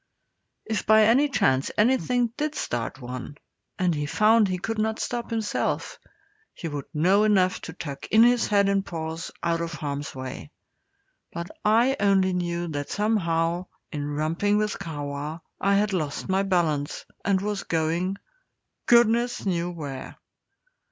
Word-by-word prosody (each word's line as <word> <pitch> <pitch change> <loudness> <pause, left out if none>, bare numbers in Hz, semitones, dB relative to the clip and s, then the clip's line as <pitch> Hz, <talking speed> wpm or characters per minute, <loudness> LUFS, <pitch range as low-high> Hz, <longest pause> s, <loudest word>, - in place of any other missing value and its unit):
If 220 -1 -2
by 220 0 +7
any 255 +7 +4
chance 145 - +2
anything 245 +1 +2
did 305 0 -2
start 120 +2 -3
one, 130 +3 -7 0.4
and 180 -2 +2
he 150 -1 -2
found 215 +5 +4
he 185 -1 -1
could 225 +4 -3
not 220 +1 0
stop 240 -1 -3
himself, 225 -2 -2 0.6
he 170 - -5
would 145 -3 -5
know 185 +7 +3
enough 190 -4 +3
to 160 - -7
tuck 145 -5 -7
in 220 +2 +6
his 240 0 +4
head 200 -1 +3
and 195 0 +2
paws 165 -3 -5
out 170 0 +1
of 170 0 -3
harm's 145 -2 -4
way; 130 - -7 0.8
but 170 +1 -6
I 235 +6 +3
only 195 -2 +3
knew 175 -1 -2
that 145 -2 -4
somehow, 175 -4 0 0.2
in 145 -2 -3
romping 160 +8 0
with 210 -1 -1
Kahwa, 145 0 -5 0.2
I 200 +1 +2
had 205 0 +2
lost 155 -6 -2
my 190 0 +2
balance, 165 -7 0 0.2
and 195 -2 +2
was 205 0 -2
going 170 +4 -1 0.7
goodness 235 0 +4
knew 175 -2 0
where! 145 -6 -7
185 Hz, 150 wpm, -25 LUFS, 155-215 Hz, 0.8 s, by